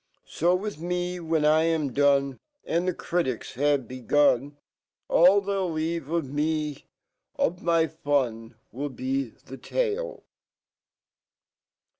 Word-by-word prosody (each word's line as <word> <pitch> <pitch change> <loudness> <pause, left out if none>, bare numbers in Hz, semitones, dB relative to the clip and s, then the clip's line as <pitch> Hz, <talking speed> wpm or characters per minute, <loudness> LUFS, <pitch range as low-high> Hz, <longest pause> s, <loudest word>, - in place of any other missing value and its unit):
So 175 +3 +1
with 200 -3 -4
me, 180 +1 -2
when 160 -2 0
I 155 +1 +5
am 155 -5 0
done, 140 -1 +2 0.3
And 170 +2 0
the 185 - +1
critics 165 -9 -2
have 140 -2 +1
begun, 140 +2 +1 0.5
All 185 +4 +6
they'll 195 -3 -1
leave 160 -1 -2
me 150 -1 -2 0.5
ormy 170 -1 +1
fun 120 -6 -1 0.2
'LI 140 +5 -3
be 130 -1 -2 0.2
the 135 - -9
tale. - - -2
155 Hz, 110 wpm, -26 LUFS, 140-175 Hz, 0.5 s, All